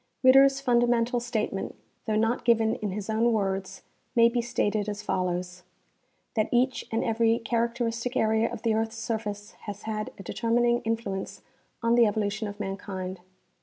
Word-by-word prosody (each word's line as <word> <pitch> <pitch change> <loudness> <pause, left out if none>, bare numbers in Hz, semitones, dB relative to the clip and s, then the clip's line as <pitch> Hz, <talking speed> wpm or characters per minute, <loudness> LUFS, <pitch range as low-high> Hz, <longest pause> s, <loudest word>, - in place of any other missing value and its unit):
Ritter's 270 +1 +7
fundamental 240 -1 +2
statement, 235 -2 -3 0.3
though 215 - +1
not 225 +3 +1
given 225 -2 +3
in 210 - -3
his 195 +1 -5
own 225 +2 +2
words, 195 -3 -2 0.3
may 230 -1 +6
be 240 0 0
stated 215 -3 -1
as 210 0 -5
follows: 180 -2 -2 0.7
That 215 -1 +1
each 255 +2 +1
and 225 - 0
every 225 0 +2
characteristic 235 +1 -1
area 220 +1 +2
of 235 -2 -7
the 225 -2 +2
earth's 225 +1 -1
surface 215 -2 -4 0.2
has 205 0 -6
had 215 -1 -3
a 195 - -9
determining 240 +3 +1
influence 225 -4 -3 0.4
on 230 0 +3
the 235 -1 +6
evolution 210 +1 -1
of 205 +1 -8
mankind. 195 -2 -5
225 Hz, 155 wpm, -27 LUFS, 205-235 Hz, 0.7 s, Ritter's